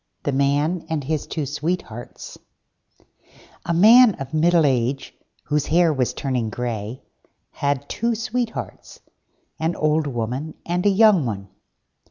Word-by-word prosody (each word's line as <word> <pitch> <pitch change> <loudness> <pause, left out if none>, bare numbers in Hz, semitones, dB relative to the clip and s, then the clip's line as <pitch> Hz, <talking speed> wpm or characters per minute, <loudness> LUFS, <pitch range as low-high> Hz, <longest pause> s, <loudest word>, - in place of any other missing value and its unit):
THE 145 - -1
MAN 145 +5 0
AND 160 -3 -2
HIS 155 +1 -3
TWO 155 -3 -3
SWEETHEARTS 150 -5 -5 1.3
A - - 0
Man 220 +4 +7
of 135 +2 -8
middle 165 +1 +3
age, 130 0 -1 0.3
whose 150 -1 -1
hair 170 -1 +3
was 130 -3 0
turning 125 -5 -2
grey, 115 +1 -5 0.5
had 140 0 -2
two 235 +1 -1
Sweethearts, 230 +1 -5 0.6
an 165 +2 -1
old 155 0 +1
woman 130 +5 -4
and 180 +3 0
a - - +6
young 200 - +4
one. 100 -3 -5
150 Hz, 130 wpm, -22 LUFS, 130-175 Hz, 1.3 s, Man